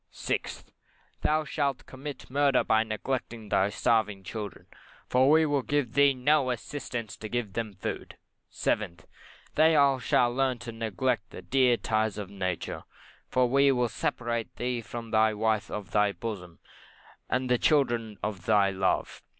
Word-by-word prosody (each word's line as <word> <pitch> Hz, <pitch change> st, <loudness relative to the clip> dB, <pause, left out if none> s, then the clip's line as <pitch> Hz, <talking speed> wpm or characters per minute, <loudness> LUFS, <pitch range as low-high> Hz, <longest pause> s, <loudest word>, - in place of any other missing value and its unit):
6th, -, -, -3 dB, 0.6 s
Thou 155 Hz, +1 st, +2 dB
shalt 140 Hz, -3 st, -1 dB
commit 135 Hz, +1 st, -8 dB
murder 140 Hz, -1 st, +3 dB
by 110 Hz, 0 st, +3 dB
neglecting 115 Hz, 0 st, -4 dB
thy 95 Hz, +1 st, +3 dB
starving 105 Hz, -1 st, +1 dB
children, 105 Hz, -1 st, -6 dB, 0.4 s
for 130 Hz, +2 st, +4 dB
we 160 Hz, +1 st, +6 dB
will 145 Hz, -2 st, +1 dB
give 130 Hz, -1 st, -1 dB
thee 140 Hz, -1 st, +5 dB
no 135 Hz, +1 st, +3 dB
assistance 125 Hz, -2 st, -4 dB
to 110 Hz, -, -8 dB
get 120 Hz, -4 st, -2 dB
them 110 Hz, -3 st, -3 dB
food. -, -, -5 dB, 0.3 s
7th, 85 Hz, -7 st, -2 dB, 0.5 s
Thou 145 Hz, -4 st, +4 dB
shalt 120 Hz, -1 st, +2 dB
learn 130 Hz, -2 st, +1 dB
to 120 Hz, 0 st, -7 dB
neglect 115 Hz, +1 st, -1 dB
the 90 Hz, -, -10 dB
dear 125 Hz, +4 st, +3 dB
ties 110 Hz, -2 st, 0 dB
of 100 Hz, -2 st, -6 dB
nature, 95 Hz, -3 st, -3 dB, 0.5 s
for 125 Hz, -1 st, +3 dB
we 140 Hz, +2 st, +4 dB
will 125 Hz, -2 st, +1 dB
separate 115 Hz, 0 st, -2 dB
thee 125 Hz, -1 st, -2 dB
from 115 Hz, 0 st, -7 dB
the 110 Hz, 0 st, +4 dB
wife 110 Hz, -1 st, 0 dB
of 105 Hz, -3 st, -6 dB
thy 105 Hz, -1 st, +3 dB
bosom, 90 Hz, -4 st, -6 dB, 0.7 s
and 130 Hz, 0 st, 0 dB
the 125 Hz, -1 st, +2 dB
children 120 Hz, -8 st, +2 dB
of 95 Hz, -4 st, -4 dB
thy 100 Hz, -3 st, +4 dB
love. 95 Hz, 0 st, -1 dB
115 Hz, 150 wpm, -28 LUFS, 105-130 Hz, 0.7 s, we